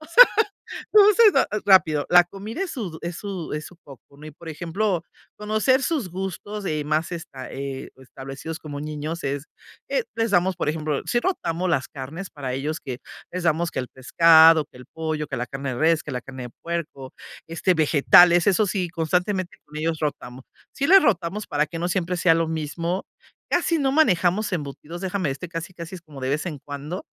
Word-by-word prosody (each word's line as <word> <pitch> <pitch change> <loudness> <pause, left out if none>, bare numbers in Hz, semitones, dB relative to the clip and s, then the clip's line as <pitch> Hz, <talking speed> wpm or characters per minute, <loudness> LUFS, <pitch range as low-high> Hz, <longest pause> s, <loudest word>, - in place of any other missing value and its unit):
O 310 - -13
sea, 485 +10 +9 0.7
lo 420 -1 +8
hacen 430 -1 +6
ra - - +4 0.2
rápido, 160 -7 +5
la 175 0 +7
comida 210 - -6
es 380 - -3
su 185 - -5
es 170 -1 -4
su 190 -5 -6
es 150 0 -4
su 180 - -14
foco, 140 0 -16
¿no? 150 - -12
Y 155 - -8
por 165 +3 -13
ejemplo, 175 +3 -2 0.3
conocer 215 +6 +1
sus 285 - -1
gustos, 195 +3 -5
eh, 155 -2 -1
más 155 +4 -1
esta, 135 -6 -8
eh, 135 -1 -6
establecidos 135 +4 -8
como 145 -2 -7
niños 155 +2 -5
es, 140 +1 -2 0.4
eh, - - 0
les 225 -1 0
damos, 180 -1 +2
por 150 - -2
ejemplo 150 -2 -2
sí 240 - +1
rotamos 185 - -1
las 145 -6 0
carnes 150 +8 -7
para 135 -3 -5
ellos 150 +4 -3
que 130 -2 -6 0.3
les 180 0 -3
damos 165 0 +1
que - - -2
el 125 - -8
pescado, 160 +5 +6
que - - -20
el 125 - -12
pollo, 155 -1 -4
que - - -5
la 125 +1 -3
carne 135 +1 -5
de - - -5
res, 160 0 +3
que 150 - -6
la 125 - -3
carne 130 -1 -9
puerco, 165 -6 -5 0.4
este, 175 +2 +1
vegetales. 170 +3 +5
Eso 205 +2 +3
sí, 185 -2 -1
constantemente 180 +3 -1
con 150 - -13
ellos 160 +1 -1
rotamos. 130 -4 -5 0.3
Sí 280 - -1
les 385 +2 +7
rotamos 195 -1 0
para 150 +1 +1
que 165 - -7
no 175 - -1
siempre 180 -1 -1
sea 170 -1 +4
lo 165 0 +1
mismo. 165 +4 -3 0.5
Casi 340 -2 +1
no 270 -2 +1
manejamos 205 - +2
embutidos, 150 +1 -5
déjame 185 -5 -2
este, 165 +6 -6
casi 170 +2 -6
casi 170 +1 -8
es - - -11
como 150 -4 -12
de 130 - -2
vez 150 +5 -1
en 155 -4 -5
cuando, 145 +5 -6
165 Hz, 200 wpm, -23 LUFS, 150-185 Hz, 0.7 s, sea